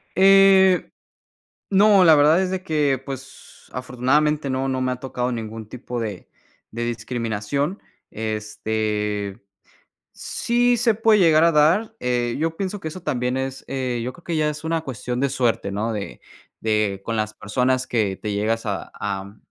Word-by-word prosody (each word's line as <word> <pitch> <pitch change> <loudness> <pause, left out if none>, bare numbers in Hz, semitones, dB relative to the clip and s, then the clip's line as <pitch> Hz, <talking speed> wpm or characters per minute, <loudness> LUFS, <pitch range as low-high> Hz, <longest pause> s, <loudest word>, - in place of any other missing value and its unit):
Eh, 195 -1 +6 0.8
no, 200 -1 +6
la 160 -2 +8
verdad 150 +4 +5
es 190 -1 0
de 185 0 -3
que, 150 -6 +1
pues, 135 -1 -10
afortunadamente 140 +4 0
no, 130 +1 -1
no 130 -1 -1
me 130 0 0
ha - - -3
tocado 125 -1 -3
ningún 110 -2 -6
tipo 125 0 -6
de 105 -5 -5 0.4
de 120 +1 -3
discriminación. 120 - -2 0.3
Este, 105 -1 -3 0.7
sí 245 +1 +1
se 235 -1 +2
puede 220 0 +4
llegar 160 -2 +5
a 170 - +4
dar 170 +9 +3
eh, 120 -1 0
yo 165 +1 -1
pienso 195 +2 -3
que 160 - -4
eso 170 +3 -9
también 125 -5 -1
es 130 0 -4
eh 130 -3 -2
yo 125 +2 -4
creo 175 - -18
que 170 - -3
ya 155 -1 +2
es 150 +1 -5
una 165 0 0
cuestión 125 -3 -4
de 140 - +2
suerte 120 -6 0
¿no? 110 +3 -2
De 105 -2 -6 0.4
de 105 -3 0
con 115 - -2
las 110 0 -2
personas 130 +4 0
que 105 -5 0
te 105 +1 -4
llegas 110 +3 -1
a 100 -2 -3
a 100 0 -4
130 Hz, 165 wpm, -22 LUFS, 110-160 Hz, 0.8 s, la